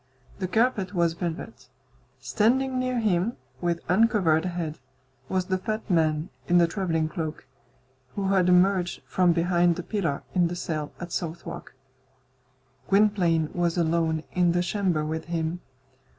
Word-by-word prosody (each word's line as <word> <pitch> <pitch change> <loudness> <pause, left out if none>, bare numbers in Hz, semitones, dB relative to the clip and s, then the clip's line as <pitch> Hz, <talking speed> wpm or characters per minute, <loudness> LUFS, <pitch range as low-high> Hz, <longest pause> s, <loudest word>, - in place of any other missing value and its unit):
The 185 - -1
carpet 215 -2 +1
was 170 -1 +2
velvet. 160 -8 -6 0.5
Standing 245 - +1
near 255 -1 -1
him, 210 +1 +1 0.2
with 170 -1 0
uncovered 185 -5 +3
head, 170 -4 -4 0.5
was 185 -1 0
the 185 0 -1
fat 215 +3 -4
man 155 -2 +1 0.2
in 175 - +4
the 170 - +6
travelling 165 -3 -1
cloak, 155 0 -5 0.7
who 195 -1 -1
had 185 -2 +3
emerged 180 0 +3
from 180 -2 +3
behind 175 0 +2
the 180 - -5
pillar 170 -10 -2
in 175 -2 +3
the 175 - -4
cell 155 -4 -3
at 175 -1 -7
Southwark. 170 -4 -5 1.1
Gwynplaine 190 -6 +3
was 175 -1 0
alone 160 -1 +1
in 175 -2 +2
the 175 0 +1
chamber 180 -4 0
with 160 +1 -3
him. 170 0 -2
175 Hz, 140 wpm, -26 LUFS, 165-190 Hz, 1.1 s, the